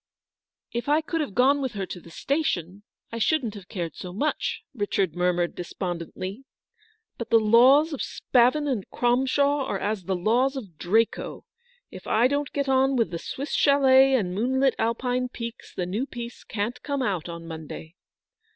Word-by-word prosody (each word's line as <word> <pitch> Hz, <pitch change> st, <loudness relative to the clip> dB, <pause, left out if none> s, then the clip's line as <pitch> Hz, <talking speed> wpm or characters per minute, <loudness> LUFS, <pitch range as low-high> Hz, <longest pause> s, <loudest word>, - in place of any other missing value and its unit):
" -, -, -68 dB, 0.3 s
If 235 Hz, +3 st, -3 dB
I 300 Hz, +2 st, +4 dB
could 325 Hz, +1 st, -2 dB
have 280 Hz, -10 st, -4 dB
gone 275 Hz, +3 st, +4 dB
with 260 Hz, -3 st, -2 dB
her 200 Hz, -2 st, -3 dB
to 180 Hz, -, -7 dB
the 170 Hz, -, -15 dB
station, 200 Hz, -, -2 dB, 0.3 s
I 230 Hz, -, -4 dB
shouldn't 245 Hz, -3 st, +1 dB
have 200 Hz, -3 st, -11 dB
cared 175 Hz, -5 st, -5 dB
so 180 Hz, -, -7 dB
much," 280 Hz, +12 st, -2 dB
Richard 200 Hz, -, -1 dB
mur 180 Hz, 0 st, +2 dB
mured 175 Hz, -1 st, -1 dB
despondently, 185 Hz, -, -5 dB, 0.8 s
"but 235 Hz, -, -5 dB
the 230 Hz, -, +6 dB
laws 255 Hz, +8 st, +5 dB
of 280 Hz, -, -4 dB
Spavin 255 Hz, +4 st, +2 dB
and 240 Hz, -9 st, -2 dB
Cromshaw 265 Hz, +4 st, +2 dB
are 200 Hz, -, -1 dB
as 205 Hz, -2 st, -3 dB
the 190 Hz, -, 0 dB
laws 240 Hz, +9 st, +2 dB
of 195 Hz, -, -8 dB
Draco. 220 Hz, +6 st, 0 dB, 0.5 s
If -, -, -10 dB
I 230 Hz, +3 st, +4 dB
don't 285 Hz, +1 st, -1 dB
get 280 Hz, -1 st, -1 dB
on 265 Hz, 0 st, +3 dB
with 230 Hz, -9 st, +1 dB
the 170 Hz, -, -4 dB
Swiss 280 Hz, -, -6 dB
chalet 270 Hz, -1 st, +5 dB
and 185 Hz, -8 st, 0 dB
moonlit 260 Hz, +6 st, +2 dB
Alpine 250 Hz, +2 st, 0 dB
peaks, 235 Hz, -1 st, -7 dB
the 180 Hz, -, -3 dB
new 210 Hz, +9 st, -2 dB
piece 240 Hz, -2 st, -8 dB
can't 230 Hz, +4 st, -4 dB
come 280 Hz, -2 st, -2 dB
out 185 Hz, -8 st, -2 dB
on 170 Hz, 0 st, -7 dB
Monday." 160 Hz, 0 st, -8 dB
235 Hz, 180 wpm, -25 LUFS, 190-270 Hz, 0.8 s, the